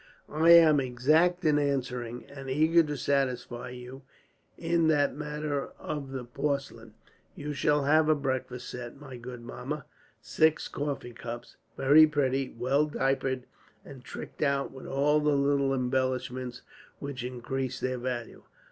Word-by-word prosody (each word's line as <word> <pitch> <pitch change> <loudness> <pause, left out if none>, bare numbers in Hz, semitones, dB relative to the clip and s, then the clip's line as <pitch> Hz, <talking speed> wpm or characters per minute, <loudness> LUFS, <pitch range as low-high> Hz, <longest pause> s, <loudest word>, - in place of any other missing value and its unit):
"I 160 +2 +3
am 160 -3 +7
exact 155 +8 +2
in 150 -1 +4
answering, 125 -4 -2
and 135 -1 -9
eager 160 +5 +4
to 150 -2 -3
satisfy 125 -3 -1
you 125 +2 -9 0.6
(in 165 -1 +1
that 145 -3 +2
matter 150 -1 -3
of 145 -3 -5
the 135 -2 -5
porcelain). 140 +3 -3 0.4
You 150 0 -5
shall 145 0 +2
have 155 +2 +4
a 155 - +5
breakfast 130 -3 -3
set, 125 +1 -7
my 140 -3 -9
good 120 0 -8
Mamma: 130 +4 -6 0.3
six 160 0 +2
coffee 140 -4 -4
cups, 120 -1 -8 0.2
very 145 +4 +7
pretty, 135 -3 0
well 135 +6 +1
diapered, 135 -2 0 0.4
and 130 -3 -11
tricked - - -9
out 140 -2 +1
with 130 - -10
all 145 +2 +2
the 150 -1 +2
little 140 -1 +2
embellishments 130 -1 -1 0.3
which 140 -3 -6
increase 125 +1 -4
their 130 -1 -2
value. 120 -1 -4
135 Hz, 140 wpm, -29 LUFS, 125-150 Hz, 0.6 s, am